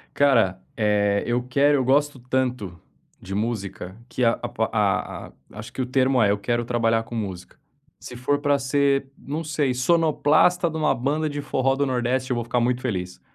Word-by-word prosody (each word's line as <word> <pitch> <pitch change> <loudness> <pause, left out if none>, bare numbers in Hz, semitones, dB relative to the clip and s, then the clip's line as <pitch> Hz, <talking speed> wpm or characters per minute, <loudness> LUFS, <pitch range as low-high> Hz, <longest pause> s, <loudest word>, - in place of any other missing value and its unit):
Cara, 115 -10 +3
eh, 105 -1 +1
eu 120 +1 0
quero 140 +4 +2
eu 130 - 0
gosto 140 +1 +1
tanto 125 -8 -2 0.4
de 95 - -7
música 100 -3 -4
que 125 +1 -1
a 115 - +2
a - - -2 0.2
a - - -1
a - - -19 0.3
acho 105 - -9
que 130 - -3
o - - -2
termo 130 -1 +2
é: 100 - +4
"Eu 100 - +1
quero 120 +3 -1
trabalhar 115 -1 +1
com 115 +1 -8
música." 95 -5 -6 0.4
Se - - -9
for 130 +4 0
para 145 -1 +2
ser, 140 0 +1
não 150 +4 -5
sei, 150 -4 -1
sonoplasta 165 +4 +3
de 160 - -6
uma 155 -1 +2
banda 150 +5 -1
de 145 0 -4
forró 135 -1 0
do 140 +1 0
Nordeste 130 +1 -1
eu 125 - +1
vou 120 - -2
ficar 120 +1 0
muito 120 +1 +1
feliz. 90 -8 -4
125 Hz, 195 wpm, -23 LUFS, 115-140 Hz, 0.4 s, é